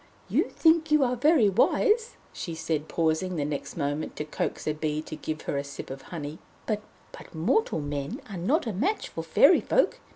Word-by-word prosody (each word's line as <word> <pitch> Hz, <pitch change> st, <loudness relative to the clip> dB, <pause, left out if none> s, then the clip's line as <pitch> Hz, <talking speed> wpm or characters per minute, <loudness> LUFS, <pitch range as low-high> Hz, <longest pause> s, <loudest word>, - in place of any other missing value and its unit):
"You -, -, +3 dB
think 320 Hz, -1 st, +3 dB
you 300 Hz, -2 st, +5 dB
are 250 Hz, -1 st, +1 dB
very 275 Hz, -2 st, +4 dB
wise," 435 Hz, -, +2 dB, 0.2 s
she 165 Hz, -, -5 dB
said, 155 Hz, -1 st, -2 dB
pausing 165 Hz, +3 st, 0 dB
the 145 Hz, -3 st, -1 dB
next 145 Hz, +2 st, -4 dB
moment 145 Hz, 0 st, -2 dB
to 150 Hz, -, -4 dB
coax 150 Hz, -, -3 dB
a 155 Hz, -, +1 dB
bee 155 Hz, 0 st, -2 dB
to 155 Hz, -, -7 dB
give 155 Hz, 0 st, -5 dB
her -, -, -2 dB
a -, -, -3 dB
sip 140 Hz, -1 st, -8 dB
of 135 Hz, 0 st, -7 dB
honey, 155 Hz, -2 st, -6 dB, 0.3 s
"but 210 Hz, -2 st, -1 dB, 0.5 s
mortal 200 Hz, -, +1 dB
men 145 Hz, -, -4 dB
are 200 Hz, -, -7 dB
not 275 Hz, -, +1 dB
a 225 Hz, -, -2 dB
match 425 Hz, -, -1 dB
for -, -, -5 dB
Fairy -, -, +5 dB
Folk. -, -, +2 dB
170 Hz, 195 wpm, -27 LUFS, -, 0.5 s, you